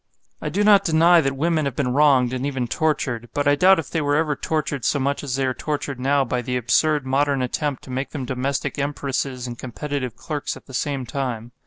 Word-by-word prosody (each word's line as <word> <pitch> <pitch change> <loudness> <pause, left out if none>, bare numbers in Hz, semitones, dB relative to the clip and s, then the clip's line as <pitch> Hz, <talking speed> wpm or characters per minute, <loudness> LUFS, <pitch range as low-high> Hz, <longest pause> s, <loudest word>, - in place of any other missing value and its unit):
I - - -2
do 205 - 0
not 205 -1 +6
deny 170 0 +5
that 135 -2 -1
women 160 +1 +1
have 140 -3 -2
been 125 -4 0
wronged 135 -4 +4
and 130 0 -3
even 135 -3 -2
tortured; 120 -5 -1
but 145 0 0
I 145 - +5
doubt 185 +6 +5
if 160 -5 -5
they 160 - 0
were 145 0 +1
ever 150 -1 +1
tortured 145 -3 -2
so 145 - +2
much 140 +1 -1
as 135 -3 -2
they 135 0 0
are 130 - 0
tortured 145 -2 -4
now 135 +1 +2
by 125 0 -1
the 125 +1 -2
absurd 145 +4 +2
modern 135 0 +1
attempt 140 +2 -2
to 130 - -10
make 130 +2 -3
them 140 -4 -5
domestic 135 +3 -2
empresses 140 -2 -2
and 120 -1 -7
competitive 130 -1 -4
clerks 150 +3 -4
at - - -16
the 130 - -13
same 135 0 -2
time. 120 -3 -4
140 Hz, 225 wpm, -22 LUFS, 130-150 Hz, -, not